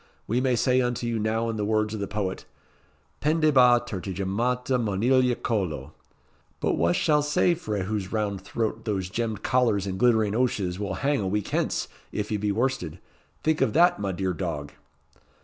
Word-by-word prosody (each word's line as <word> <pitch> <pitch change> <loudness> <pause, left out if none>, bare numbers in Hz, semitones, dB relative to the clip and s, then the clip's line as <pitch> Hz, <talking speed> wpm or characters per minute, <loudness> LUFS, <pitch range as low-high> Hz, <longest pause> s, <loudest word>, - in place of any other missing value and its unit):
We 120 +4 0
may 130 -1 +2
say 130 +2 +3
unto 120 -1 -1
you 115 -1 -1
now 110 +2 0
in 115 -1 -2
the 105 - -1
words 110 0 0
of 110 - -4
the 100 - -3
poet 95 -2 -3 0.8
'Pendebant 140 -6 +4
ter 100 -6 -4
ti 95 +2 -5
gemmata 125 +7 0
monilia 120 +4 +2
collo;' 85 - -2 0.7
but - - +1
wha 85 +1 +2
shall 150 - +2
say 150 +4 +2
frae 105 - -3
whose 100 -1 -3
round 105 -3 -1
throat 110 +3 -3
those 95 -4 -2
gemmed 110 -1 -3
collars 115 -6 +2
and 95 -1 -4
glittering 110 -4 +3
ouches 100 -7 0
will 100 -2 -3
hang 145 -1 +2
a 95 - -1
week 105 +1 -1
hence, - - -1 0.2
if 105 0 -3
ye 105 - +1
be 105 0 -1
worsted? 110 - -1 0.5
Think 155 0 +1
of - - +2
that, 175 - +4
my 100 -1 -1
dear 95 0 -1
dog." 75 -3 -4
110 Hz, 185 wpm, -26 LUFS, 100-125 Hz, 0.8 s, Pendebant